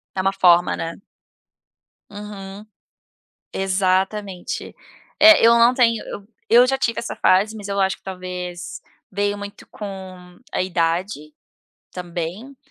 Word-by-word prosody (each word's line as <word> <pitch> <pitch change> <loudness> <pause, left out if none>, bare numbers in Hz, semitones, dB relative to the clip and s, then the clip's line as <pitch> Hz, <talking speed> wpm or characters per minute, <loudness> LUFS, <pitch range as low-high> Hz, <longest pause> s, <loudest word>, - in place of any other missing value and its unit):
Está 190 - 0
uma 195 +1 +1
forma, 180 -2 +4
né. 165 0 -4 1.1
Uhum. 205 -1 -9 0.9
Exatamente. 190 0 -1 0.5
Eh, 320 -2 +8
eu 230 - +7
não 235 +2 +5
tenho 230 -3 +2
eu 200 0 -9 0.2
eu 240 +2 +7
já 270 +1 +1
tive 230 -3 -1
essa 235 - -5
fase 205 +4 +2
mas 205 -2 -8
eu 200 0 -1
acho 190 0 +1
que - - -34
talvez 180 -2 -7 0.3
veio 205 +1 -1
muito 205 0 -9
com 185 -3 -9
a - - 0
idade, 170 -2 -2 0.6
também, 180 +9 -6
195 Hz, 125 wpm, -21 LUFS, 180-210 Hz, 1.1 s, Eh